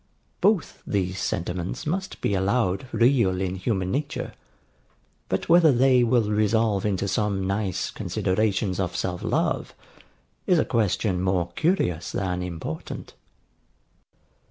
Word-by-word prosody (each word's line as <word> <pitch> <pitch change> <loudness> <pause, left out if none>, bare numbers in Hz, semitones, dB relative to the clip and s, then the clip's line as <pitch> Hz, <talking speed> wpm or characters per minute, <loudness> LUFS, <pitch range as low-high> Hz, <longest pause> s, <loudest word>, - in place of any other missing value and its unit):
Both 205 -5 +1
these 95 -2 -1
sentiments 90 -2 -3
must 185 +5 -3
be - - 0
allowed 100 +3 +1
real 115 -5 +3
in 95 -1 -1
human 95 -1 -1
nature: 145 +2 -3 1.0
but - - -1
whether 165 -2 +6
they 130 0 +4
will 115 -3 +2
resolve 105 -1 +2
into 100 -1 -1
some 100 -1 0
nice 100 -1 -1
considerations 95 -1 -1
of 90 -2 -2
self 90 -1 -2
love, - - -1 0.7
is 180 - +4
a - - +2
question 100 -4 0
more 90 -2 0
curious 90 - 0
than 90 -2 -2
important. 80 -3 -6
100 Hz, 120 wpm, -25 LUFS, 95-120 Hz, 1.0 s, whether